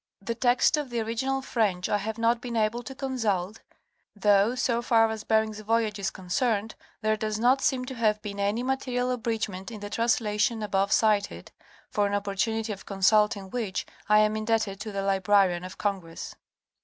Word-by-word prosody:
The 220 +4 -3
text 245 +5 +3
of 295 -3 -3
the 240 -1 -2
original 265 +4 -1
French 205 -8 0
I 205 - +1
have 220 +2 -4
not 230 +1 +2
been 240 -2 -5
able 220 +2 +1
to 255 +3 -9
consult, 225 -8 -2 0.6
though, 205 +3 +3
so 240 -2 0
far 230 -1 +4
as 220 -1 -5
Bering's 220 -1 +1
voyage 215 -1 0
is 195 - -1
concerned, 210 +4 -1 0.3
there 215 0 +2
does 215 0 -2
not 250 +4 +3
seem 255 -1 +1
to 260 - -6
have 215 -3 +1
been 200 -1 -6
any 205 +4 0
material 255 -1 -1
abridgment 220 -6 -3
in 220 -3 -8
the 205 0 -7
translation 220 -1 +1
above 200 -1 0
cited, 210 -2 +1 0.4
for 205 -4 +1
an 200 - -1
opportunity 210 +2 -1
of 195 - -12
consulting 200 0 +2
which 220 -6 -2 0.2
I 210 - +6
am 215 0 +2
indebted 215 -2 0
to 215 +1 -5
the 195 -1 -3
Librarian 195 -2 +2
of 185 +1 -8
Congress. 190 -5 -4
215 Hz, 180 wpm, -27 LUFS, 200-235 Hz, 0.6 s, I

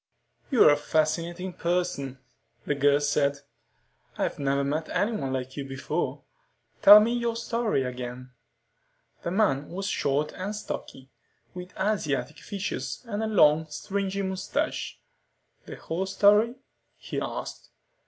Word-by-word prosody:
"You're 245 - +6
a 145 - +3
fascinating 170 +4 -1
person," 170 -7 -1 0.5
the - - +1
girl 140 0 +3
said. 140 -1 +1 0.8
"I've - - -2
never 140 0 +1
met 155 +3 -2
anyone 205 - -1
like 130 0 -4
you 140 - -4
before. 135 0 -3 0.6
Tell 205 +1 +11
me 225 +3 +2
your 235 -1 -1
story 230 - 0
again." 125 0 -6 0.9
The - - -3
man 175 -8 +1
was 195 +3 -4
short 145 -5 0
and 195 +3 -4
stocky, 135 -9 -7 0.4
with 180 0 -9
Asiatic 150 - -1
features 205 +4 -5
and 210 -1 -3
a 220 - 0
long, 160 -7 +4
stringy 195 +4 -3
mustache. 190 -1 -2 0.7
"The - - -7
whole 180 +4 -3
story?" 210 +4 +4 0.4
he - - -5
asked. - - -6
170 Hz, 125 wpm, -27 LUFS, 140-200 Hz, 0.9 s, Tell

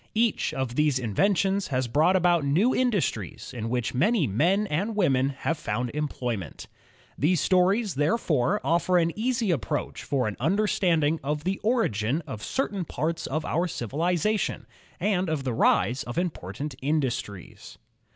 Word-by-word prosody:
Each 225 -1 +1
of 130 -3 -3
these 150 0 +2
inventions 195 - +1
has 130 -2 -1
brought 155 +9 +3
about 175 -3 +3
new 175 - +2
industries 200 - -1
in 115 -1 -4
which 125 -1 -1
many 185 - +2
men 170 - +2
and 200 +6 -2
women 135 -9 +2
have 145 +3 -3
found 125 -5 -2
employment. 125 - -4 0.5
These 165 +4 +2
stories, 190 - +2
therefore, 155 - +1
offer 175 +2 +2
an 170 -1 +2
easy 230 -2 0
approach 130 -12 -3
to 135 -3 +1
an 105 -3 -3
imderstanding 165 -5 +1
of 150 +1 -2
the 190 +2 -1
origin 160 - 0
of 130 -8 -7
certain 200 - -2
parts 160 +2 -3
of 155 +3 -2
our 170 +3 0
civilization, 175 - -1 0.3
and 185 -1 0
of 155 -3 -1
the 130 -2 -2
rise 120 +3 +2
of 120 -2 -6
important 150 - -3
industries. 130 - -3
155 Hz, 145 wpm, -26 LUFS, 130-190 Hz, 0.5 s, brought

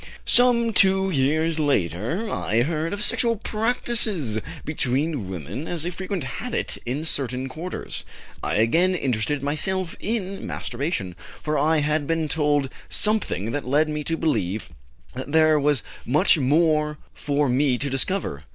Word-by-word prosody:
"Some 235 -2 +4
two 190 -1 +3
years 155 +3 +1
later 135 - 0
I 115 - +1
heard 160 +2 -1
of 205 +1 -2
sexual 230 +1 +3
practices 215 - 0 0.3
between 140 - 0
women 95 - -5
as 170 -2 -3
a 175 - -1
frequent 185 -1 -4
habit 185 - -3
in 140 +6 -2
certain 130 -4 -1
quarters. 160 +7 -6 0.4
I - - -1
again 165 - +3
interested 135 -1 -1
myself 170 +5 0
in 200 -3 -3
masturbation, 120 - -3 0.3
for 150 0 -1
I 155 +2 +3
had 150 0 0
been 165 -1 0
told 145 -3 +1 0.2
something 210 - +1
that 145 -2 -3
led 150 +4 +3
me 150 0 -2
to 165 - 0
believe 110 - -1 0.4
that 130 +3 -6
there 155 -1 +5
was 145 -4 +1 0.2
much 140 +6 +4
more 150 +1 +2 0.2
for 145 0 0
me 130 0 +2
to 145 - -2
discover. 135 - -1
150 Hz, 140 wpm, -24 LUFS, 130-180 Hz, 0.4 s, there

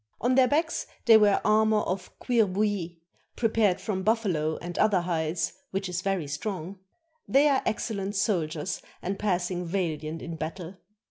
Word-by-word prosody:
On 245 +2 +2
their 255 0 +5
backs 315 +5 0 0.2
they 230 - +8
wear 210 -2 +4
armor 215 0 +4
of 185 -1 -3
cuir 235 -4 +2
bouilli, 190 -3 -1 0.4
prepared 220 -5 +2
from 190 -3 -2
buffalo 185 -8 0
and 175 0 -7
other 205 -4 +4
hides, 165 -2 -1 0.2
which 195 0 -3
is 180 0 -3
very 195 -4 -1
strong. 180 +5 -5 0.5
They 280 +2 +5
are 275 -2 +3
excellent 205 -2 -2
soldiers 175 -4 -1 0.2
and 195 +2 -3
passing 180 -3 -1
valiant 165 -3 -3
in 165 -1 -6
battle. 165 +3 -6
190 Hz, 150 wpm, -27 LUFS, 170-215 Hz, 0.5 s, they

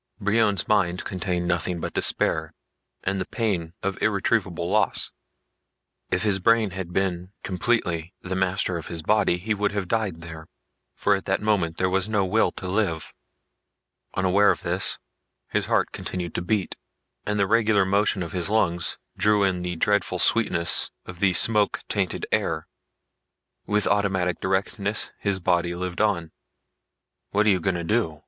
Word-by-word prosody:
Brion's 105 -1 +1
mind 90 -4 +1
contained 90 -3 -2
nothing 85 0 -1
but - - -5
despair - - 0 0.5
and 95 0 -1
the - - -4
pain 95 -8 -2
of 100 0 -3
irretrievable 100 -4 0
loss. 105 +4 +1 1.0
If 90 - 0
his 100 -3 +2
brain 115 +1 +3
had 90 -1 -6
been 90 0 -2
completely 90 -4 -1
the 95 0 -4
master 95 -1 0
of 80 - -7
his 85 -2 -3
body 105 -2 +2
he 105 +5 -2
would 105 -1 -1
have 100 -3 -2
died 100 -5 -1
there, 80 -1 -9 0.5
for 100 - +2
at 95 -1 -2
that 95 - 0
moment 95 -6 0
there 95 - +1
was 95 +2 0
no 105 -3 +1
will 110 +5 +2
to 95 - -7
live. 90 -5 -1 1.0
Unaware 95 +2 +3
of - - 0
this, - - 0 0.5
his - - -1
heart - - +1
continued 90 -2 -5
to - - -2
beat 95 +1 -1 0.5
and 105 0 0
the 100 - +3
regular 110 -1 +3
motion 100 0 +1
of 85 - -7
his 90 0 -2
lungs 90 -6 +1 0.2
drew 105 -1 +3
in 95 -2 +1
the 90 0 -3
dreadful 100 +1 +1
sweetness 85 -5 +5 0.2
of 90 -1 -9
the 100 -1 +3
smoke 105 +3 +3
tainted - - -1
air. - - 0 1.0
With 105 0 +1
automatic 95 -3 +1
directness 100 +2 -1
his 100 -2 0
body 85 -1 +1
lived 90 +1 -3
on. 85 -7 0 1.0
"What 105 +1 +2
you 100 -4 +4
gonna 85 0 -1
do?" 85 -6 0
95 Hz, 155 wpm, -24 LUFS, 90-105 Hz, 1.0 s, sweetness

